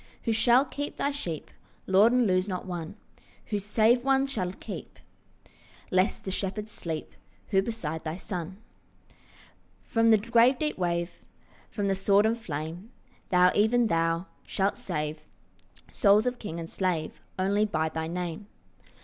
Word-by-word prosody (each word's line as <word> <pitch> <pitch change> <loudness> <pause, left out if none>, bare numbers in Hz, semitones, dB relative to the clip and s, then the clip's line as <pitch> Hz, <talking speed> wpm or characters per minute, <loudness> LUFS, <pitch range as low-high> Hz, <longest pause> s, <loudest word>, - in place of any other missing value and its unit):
Who 230 - 0
shall 240 +4 +4
keep 290 +2 -5
thy 280 - 0
sheep, 175 - -5 0.3
Lord, 200 +5 +5
and 250 -1 +3
lose 185 -1 +2
not 185 -2 -4
one? 175 -1 -5 0.6
Who 205 - +1
save 220 +4 +3
one 270 0 +3
shall 210 -10 -2
keep, - - -8 0.9
Lest 185 +1 +1
the 190 - -2
shepherds 205 +3 -3
sleep? 160 -2 -5 0.4
Who 195 -2 +3
beside 175 -8 -4
the 160 +1 -4
Son? 185 -1 -5 1.3
From 230 0 +2
the 220 - +7
grave 235 +4 +4
deep 300 +1 -1
wave, 175 -1 -2 0.5
From 205 -2 -2
the 195 - +2
sword 200 +2 +3
and 225 +1 +2
flame, 170 - -6 0.4
Thou, 180 0 +5
even 230 +3 +3
thou, 165 -2 +1 0.2
shalt 195 +1 0
save 150 -3 -4 0.6
Souls 210 +1 +4
of 250 0 -1
king 170 -5 -5
and 165 - -5
slave 170 -4 -2 0.2
Only 200 +3 +2
by 160 -6 0
thy 160 0 -3
Name. 175 +3 -4
195 Hz, 150 wpm, -28 LUFS, 170-225 Hz, 1.3 s, the